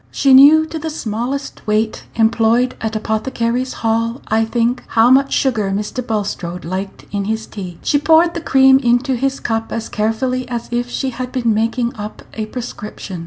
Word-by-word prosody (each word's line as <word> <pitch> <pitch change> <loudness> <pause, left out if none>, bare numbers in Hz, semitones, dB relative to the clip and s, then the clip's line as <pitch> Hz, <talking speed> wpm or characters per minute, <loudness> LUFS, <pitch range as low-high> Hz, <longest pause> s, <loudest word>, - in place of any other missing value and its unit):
She 275 -2 +3
knew 295 +4 +8
to 320 0 -6
the 320 +1 -4
smallest 245 -1 -4
weight 215 +1 0
employed 230 +2 +2
at 220 0 -3
Apothecaries' 230 +3 -2
Hall, 230 +2 0
I 220 +1 +2
think 235 +2 0
how 230 +2 +4
much 275 +1 +4
sugar 225 -7 +1
Mr. 210 +5 -3
Bulstrode 195 -6 -4
liked 190 +3 -5
in 200 -1 -2
his 220 +1 -2
tea. 180 -4 -8
She 290 - +2
poured 325 +3 +4
the 340 - -4
cream 265 -3 +5
into 245 +1 +1
his 270 +2 -1
cup 225 -1 -2
as 230 - -4
carefully 250 +4 -1
as 235 -1 -4
if 240 0 -1
she 265 +1 -2
had 250 +1 -5
been 235 -3 +1
making 230 +2 -1
up 210 +1 -7
a 215 -1 -4
prescription. 215 -6 -7
235 Hz, 175 wpm, -18 LUFS, 220-260 Hz, -, knew